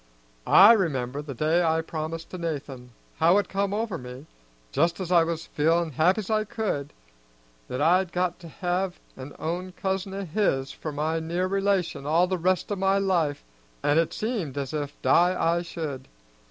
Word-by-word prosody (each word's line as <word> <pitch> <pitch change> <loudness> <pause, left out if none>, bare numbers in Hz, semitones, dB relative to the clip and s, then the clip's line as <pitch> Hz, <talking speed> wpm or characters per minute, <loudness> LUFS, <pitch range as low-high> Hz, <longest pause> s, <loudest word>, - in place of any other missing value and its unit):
I 205 +5 +9
remember, 145 - -1
the 145 -3 -7
day 155 +7 +2
I 160 -1 +2
promised 160 0 -5
to 185 - -6
Nathan, 140 -6 -5 0.3
how 170 +4 +5
it 205 -3 +1
come 195 0 -1
over 210 -3 -2
me, 125 +3 -9 0.5
just's 170 +4 0
I 170 -2 +6
was 165 0 -3
feelin' 165 +2 +1
happy's 180 - +2
I 215 -1 +1
could, 205 -10 -3 0.8
that 130 +3 -2
I'd 180 +2 +3
got 180 -1 -1
to 170 - -11
have 180 +3 -2 0.2
an 135 +2 -9
own 180 +3 -4
cousin 190 +1 -3
o' 200 0 -4
his 150 -7 0
for 155 - -6
my 155 +3 -1
near 170 +3 -1
relation 190 -7 0
all 165 +4 +4
the 185 0 -2
rest 185 +3 0
o' - - +1
my 195 0 +2
life, 175 -7 0 0.4
an' 145 +2 +3
it 165 - +1
seemed 210 - -3
as 140 0 -3
if 145 -2 -4
die 180 +2 +4
I 170 +1 +2
should. 155 -6 -6
170 Hz, 175 wpm, -26 LUFS, 150-190 Hz, 0.8 s, I